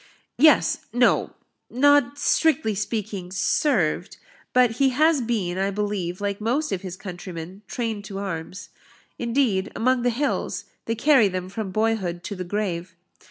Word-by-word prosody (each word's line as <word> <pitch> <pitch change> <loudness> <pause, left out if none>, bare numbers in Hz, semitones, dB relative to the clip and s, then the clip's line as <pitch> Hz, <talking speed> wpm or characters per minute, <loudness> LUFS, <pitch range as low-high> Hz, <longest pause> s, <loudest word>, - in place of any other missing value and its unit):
"Yes 310 +2 +5
no 245 0 +2 0.3
not, 285 0 +3
strictly 295 -7 +2
speaking, 205 -3 -4
served; 285 - 0 0.3
but 250 -2 +3
he 270 - +5
has 305 +3 +3
been, 200 -7 -1
I 195 +1 +1
believe, 200 -3 -2
like 200 0 -3
most 270 +8 0
of 190 -2 -2
his 185 -1 -7
countrymen, 180 0 -8
trained 225 -4 -3
to 195 0 -7
arms. 185 -1 -5 0.5
Indeed, 235 -5 +1
among 255 +1 +2
the 245 - +2
hills, 270 +5 -2 0.2
they 225 - -1
carry 260 -2 +5
them 185 -1 -4
from 200 0 -4
boyhood 195 -5 -1
to 200 - -5
the 185 - -4
grave. 180 -2 -3
210 Hz, 145 wpm, -24 LUFS, 185-245 Hz, 0.5 s, Yes